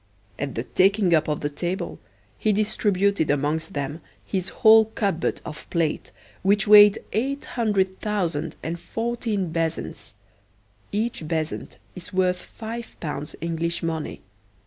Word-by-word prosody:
At 140 -3 -3
the 115 - -2
taking 195 +4 +3
up 155 -1 +3
of 150 -1 -1
the 145 - -1
table 175 +6 -3 0.4
he 215 - +2
distributed 200 -4 +1
amongst 150 +3 0
them 145 +3 -3 0.2
his 185 -2 -2
whole 220 0 +6
cupboard 200 -5 -1
of 155 -1 -8
plate, 165 -3 -1 0.3
which 200 +1 +3
weighed 210 0 +9 0.2
eight 270 +6 -1
hundred 195 -5 0
thousand 170 -7 -1
and 170 +2 -3
fourteen 225 -4 -2
bezants 165 0 -3 0.8
(Each 220 +1 -1
bezant 160 -1 -3 0.2
is 180 -2 -10
worth 185 -1 +1
five 230 +1 -8
pounds 150 -2 -5
English 170 0 -2
money.) 160 -2 -3
185 Hz, 130 wpm, -24 LUFS, 160-210 Hz, 0.8 s, weighed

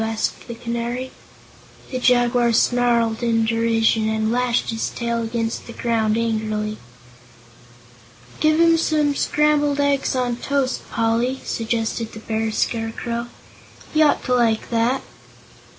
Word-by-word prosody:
asked 220 -1 -3
the 235 - -6
Canary. 235 +2 -4 0.8
The 255 - -2
Jaguar 245 -1 +3
snarled 235 -1 +2
in 230 -1 +2
derision 225 -1 +2
and 220 0 0
lashed 245 -1 0
his 225 0 -2
tail 235 -1 -2
against 230 0 -3
the 235 - -8
ground 225 -2 0
angrily. 215 -2 -2 1.6
"Give 310 +1 +3
him 335 0 +5
some 305 -3 +1
scrambled 295 0 +1
eggs 280 -2 +1
on 245 -2 -1
toast, 275 0 -2
Poly," 235 +3 0
suggested 225 0 -2
the 220 - -8
Bear 220 0 -2
Scarecrow. 235 +1 -2 0.7
"He 310 - +3
ought 300 - +3
to 250 - 0
like 230 -3 +1
that." 235 +3 +1
235 Hz, 125 wpm, -21 LUFS, 225-255 Hz, 1.6 s, him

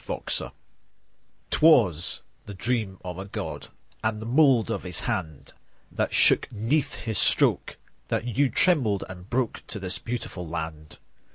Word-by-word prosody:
Ireland - - -2 1.0
'TWAS 105 - +4 0.3
the 100 - -7
dream 110 -2 -1
of 90 0 -6
a 95 - -5
God, 100 - -6 0.4
And 110 -1 -1
the 110 - -7
mould 130 -2 +4
of - - -2
His 90 -3 -4
hand, 90 - -4 0.4
That - - -1
you - - -4
shook - - +5
'neath 120 +7 0
His 110 -2 -1
stroke, - - +2 0.3
That - - -1
you 130 +4 +1
trembled 120 - +2
and 90 +1 -11
broke 125 -2 -1
To 105 - -4
this 95 -2 -2
beautiful 115 -7 -5
land. 80 -2 -6
105 Hz, 150 wpm, -26 LUFS, 90-120 Hz, 1.0 s, shook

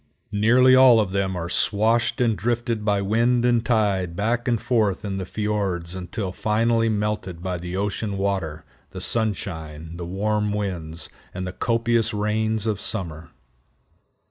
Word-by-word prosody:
Nearly 120 +5 +5
all 130 -3 +7
of 105 -4 0
them 95 -1 -1
are 85 -1 -3
swashed 110 +5 +1
and 115 -3 +2
drifted 115 +2 -1
by 100 -2 +1
wind 120 +4 +2
and 120 -2 +3
tide 100 -7 +1
back 115 +5 -1
and 120 -2 +2
forth 110 -4 0
in 95 -1 -3
the 95 - -5
fiords 100 -5 -2
until 95 +2 -4
finally 115 +3 +1
melted 105 -5 -2
by 90 -2 -2
the 90 +2 -5
ocean 100 0 -2
water, 95 -6 -2 0.2
the - - -8
sunshine, 80 -8 -2
the 85 - -5
warm 105 +3 0
winds, 90 -6 -4 0.3
and 95 0 -3
the 90 - -5
copious 115 0 +1
rains 110 +1 0
of 105 -3 -1
summer. 85 -7 -2
105 Hz, 150 wpm, -23 LUFS, 95-115 Hz, 0.3 s, all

